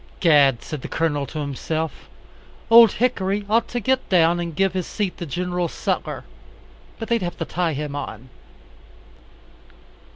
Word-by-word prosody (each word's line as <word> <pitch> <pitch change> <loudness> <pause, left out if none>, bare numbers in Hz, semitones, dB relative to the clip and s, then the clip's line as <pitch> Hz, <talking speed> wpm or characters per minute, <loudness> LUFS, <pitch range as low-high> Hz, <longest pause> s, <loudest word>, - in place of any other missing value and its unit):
"Gad," 145 -8 +4
said 150 -3 -6
the - - -6
Colonel 145 -4 -1
to 155 - -8
himself, 155 +2 -4 0.6
"Old 230 -2 +9
Hickory 205 -4 0
ought 225 +2 +2
to 245 - -3
get 260 +3 0
down 175 -2 +4
and 170 -2 -4
give 195 +1 +1
his 185 -2 -3
seat 205 -4 -3
to 170 - -5
Gen. 175 +4 -2
Sutler - - -3 0.7
but 225 - -6
they'd 235 -2 +1
have 175 -1 -4
to 165 - -3
tie 170 -1 -1
him 145 0 -4
on." 130 -3 -7
175 Hz, 155 wpm, -22 LUFS, 150-200 Hz, 0.7 s, Old